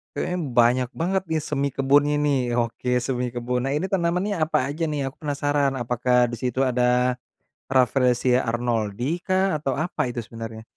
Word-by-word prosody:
kayaknya 180 - -2 0.2
banyak 120 +1 +4
banget 190 +2 +1
nih 160 -1 0
semi 140 -1 0
kebunnya 145 +2 +3
nih. 145 -2 +2 0.2
Oke 120 +1 -2 0.2
semi 125 -1 -1
kebun. 125 +1 -2
Nah - - -1
ini 185 - -2
tanamannya 180 +2 0
apa 155 - +1
aja 150 +4 -3
nih 145 -2 -2
aku 135 +2 -6
penasaran, 145 -1 0
apakah 125 +1 +1
di - - -3
situ 125 0 -2
ada, 125 0 +2 0.6
Rafflesia 125 -1 +3
Arnoldii 120 - -1
kah, 185 0 +2
atau 140 -2 -2
apa 180 - -6
itu 120 -1 -4
sebenarnya? 115 -1 -8
130 Hz, 160 wpm, -24 LUFS, 120-150 Hz, 0.6 s, banyak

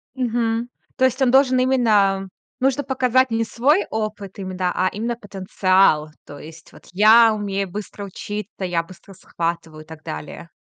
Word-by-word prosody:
Мгм. 235 -2 -1 0.3
То 260 - +3
есть 260 +1 0
он 255 -2 +3
должен 260 -1 +4
именно 210 -7 +2 0.3
нужно 270 +2 +1
показать 260 -1 +1
не 225 0 0
свой 280 - +1
опыт 210 -3 -5
име 185 -1 -6
да, 180 -1 -1
а 185 +1 +1
именно 230 +3 -3
потенциал. 190 -6 +1 0.2
То 145 0 -11
есть: 160 +1 -13
"Вот - - -17
я 220 +3 +6
умею 200 -2 -3
быстро 205 +1 -7
учиться, 205 +1 -7
я 175 -2 0
быстро 185 +3 -15
схватываю" 165 -3 -5
и - - -27
так 160 -1 -12
далее. 75 0 -8
205 Hz, 165 wpm, -21 LUFS, 185-240 Hz, 0.3 s, я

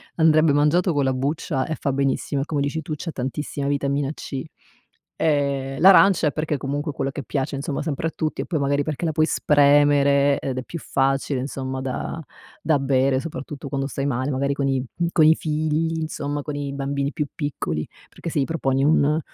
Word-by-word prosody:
Andrebbe 155 -2 +4
mangiato 155 +5 +3
con 145 -1 +1
la 130 - +1
buccia 135 +1 -1
e 160 - -3
fa 140 - 0
benissimo 140 0 0
e - - -2
come 150 -2 -1
dici 145 +3 -1
tu 155 - -5
c'ha 165 +3 -5
tantissima 140 +1 -4
Vitamina 140 0 0
C. 135 -3 -6 0.8
Ehm, 140 -3 0
l'arancia, 190 -2 +7
è - - +1
perché 155 0 -2
comunque 145 +3 -3
quella 135 0 -2
che 140 - -6
piace, 135 0 -2
insomma 140 +1 -3
sempre 150 +1 -2
a - - -3
tutti, 155 -1 -2
e - - -5
poi 165 -4 -1
magari 140 +1 +1
perché 155 +2 -4
la 160 - +1
puoi 155 0 +2
spremere 145 -2 +4
ed 130 -2 -4
è - - -5
più 170 - -7
facile 135 -1 0
insomma 130 0 -4
da 135 +5 -4 0.4
da 155 -2 +2
bere, 135 -1 +2
soprattutto 140 -1 -7
quando 135 0 -2
stai 140 0 -3
male, 130 0 -1
magari 140 +1 0
con 140 0 -1
i 135 -2 0 0.3
coi 155 -1 +6
figli, 155 +1 -1
insomma 145 -2 -3
con 150 0 -5
i 145 -1 -3
bambini 140 0 -2
più 150 - -2
piccoli, 130 - -3 0.2
perché 170 - -7
se 150 - -1
gli 135 - +2
proponi 135 -4 0
un 150 +1 +3
140 Hz, 195 wpm, -23 LUFS, 135-155 Hz, 0.8 s, l'arancia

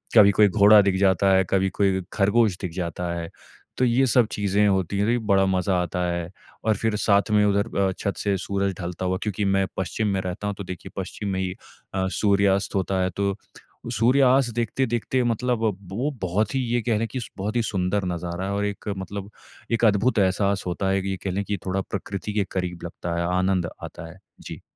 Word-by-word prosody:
कभी 100 -2 +8
कोई 105 +1 +5
घोड़ा 105 +1 +7
दिख 100 -1 +1
जाता 95 0 +3
है, 95 - +4
कभी 95 0 +2
कोई 95 0 +1
ख़रगोश 105 -1 +2
दिख 90 -3 -3
जाता 85 -1 -3
है। 85 -1 -5 0.5
तो 130 - +3
ये 125 +3 +3
सब 120 -1 +4
चीज़ें 105 0 +1
होती 95 0 0
हैं 115 +2 +1
बड़ा 95 -1 +4
मज़ा 95 0 +1
आता 90 +1 -4
है 85 0 -3 0.4
और 110 -1 +3
फिर 110 -2 0
साथ 100 +1 +2
में 105 0 +4
उधर 100 +2 0
अ, 95 -1 +2
छत 100 - -2
से 100 -1 0
सूरज 100 0 -1
ढलता 90 +1 -4
हुआ 95 0 0
क्योंकि 105 -1 -2
मैं 95 0 +2
पश्चिम 105 +3 -1
में 95 - 0
रहता 95 +3 -4
हूँ 100 - -2
तो 100 - -5
देखिए 90 -1 -8
पश्चिम 100 +2 -4
में 95 - -1
ही 90 -1 -2 0.4
अ, 95 0 0
सूर्यास्त 100 -1 +2
होता 95 0 0
है 95 - +1
तो 100 -1 0 0.6
सूर्यास्त 125 +1 +3
देखते-देखते 120 +1 0
मतलब 120 0 0 0.3
वो 135 +8 -1
बहुत 100 +5 0
ही 135 - +2
ये 120 - +2
कह 115 -2 +1
लें 115 - -1
कि 130 - -3 0.2
बहुत 105 +4 -3
ही 120 - +3
सुंदर 95 0 -1
नज़ारा 90 +3 -4
और 100 0 0
एक 100 +1 -5
मतलब 100 +1 -6 0.4
एक 115 0 +2
अद्भुत 110 +2 +3
एहसास 100 +1 +1
होता 90 +2 -1
है 95 0 +1
कि 95 - -3
ये 95 - -2
कह 95 - -1
लें 100 +2 -1
कि 100 -1 -2
थोड़ा 95 +1 0
प्रकृति 100 +2 -5
के 105 -1 +1
क़रीब 90 -2 -3
लगता 85 0 -5
है, 85 - 0
आनंद 95 -2 +1
आता 80 - -8
है। 90 - -15 0.2
जी। - - -8
100 Hz, 210 wpm, -24 LUFS, 95-105 Hz, 0.6 s, कभी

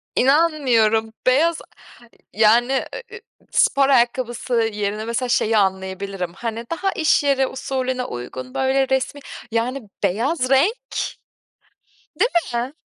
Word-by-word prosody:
İnanmıyorum, 250 -7 +3
beyaz, 320 +6 +3 0.8
yani, 230 +4 +4 0.4
ııı, 465 - -9 0.3
spor 275 0 +3
ayakkabısı 245 -1 +1 0.2
yerine 210 +1 -3
mesela 235 +2 -2
şeyi 225 -2 +2
anlayabilirim, 190 -2 -1
hani, 230 +1 -5
daha 385 +4 -1
iş 315 -2 +2
yeri 270 -2 +2
usulüne 260 -1 -3
uygun, 125 - -7
böyle, 265 0 +1
resmi, 265 +2 -1 0.3
yani, 240 +3 -1 0.2
beyaz 255 - 0
renk, 380 - +2 1.3
değil 475 - +3 0.3
mi? 265 - -9
250 Hz, 105 wpm, -21 LUFS, 220-275 Hz, 1.3 s, yani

